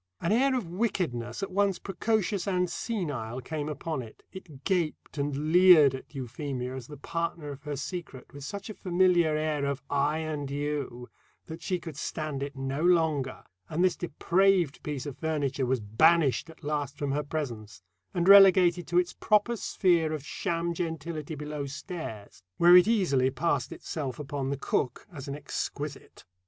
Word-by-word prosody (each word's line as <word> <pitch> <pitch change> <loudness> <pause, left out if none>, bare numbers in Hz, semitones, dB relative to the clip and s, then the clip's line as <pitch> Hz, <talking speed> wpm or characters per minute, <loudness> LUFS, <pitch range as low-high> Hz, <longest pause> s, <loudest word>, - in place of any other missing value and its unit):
An 170 - -1
air 260 +4 +3
of 245 -6 -1
wickedness, 170 - -2
at 195 - -4
once 195 0 +2
precocious 200 0 -1
and 180 -2 +1
senile, 145 - -3
came 150 +3 -4
upon 155 -1 -3
it; 115 -3 -12
it 155 -8 -11
gaped 165 -4 -1
and 145 +2 -1
leered 175 -7 +8
at 130 +2 -9
Euphemia 130 0 -4
as 130 -2 -7
the 150 - -10
partner 165 0 -3
of 140 0 -9
her 150 0 -4
secret 140 -2 -7
with 140 -1 -9
such 200 +6 -6
a 215 - -6
familiar 175 -4 +2
air 155 -2 -1
of 140 0 -2
"I 145 +2 +2
and 155 -3 -3
you" 140 -4 -3 0.4
that 160 +1 -8
she 185 - -1
could 160 -4 -9
stand 155 -3 -4
it 140 0 -4
no 135 +2 -3
longer, 160 -6 +2 0.3
and 170 +4 0
this 185 - +3
depraved 175 0 +1
piece 145 -3 -4
of 145 -3 -7
furniture 140 -4 -1
was 130 0 +1
banished 145 +7 +3
at 160 0 -15
last 145 -1 -2
from 140 -1 -2
her 145 +2 0
presence, 120 - -5 0.3
and 175 0 -1
relegated 185 -3 +7
to 175 +2 0
its 180 0 +2
proper 215 +3 +2
sphere 170 -7 +1
of 150 -2 -5
sham 170 +2 -2
gentility 160 -2 -4
below 150 -1 -5
stairs, 140 - -7 0.2
where 175 +1 +7
it 180 +2 +8
easily 165 - +3
passed 135 -1 -1
itself 140 -6 -5
upon 140 -2 -4
the 140 - -2
cook 130 -1 -1
as 140 -3 -8
an 140 - -4
exquisite. 145 -1 -6
155 Hz, 170 wpm, -28 LUFS, 140-175 Hz, 0.4 s, leered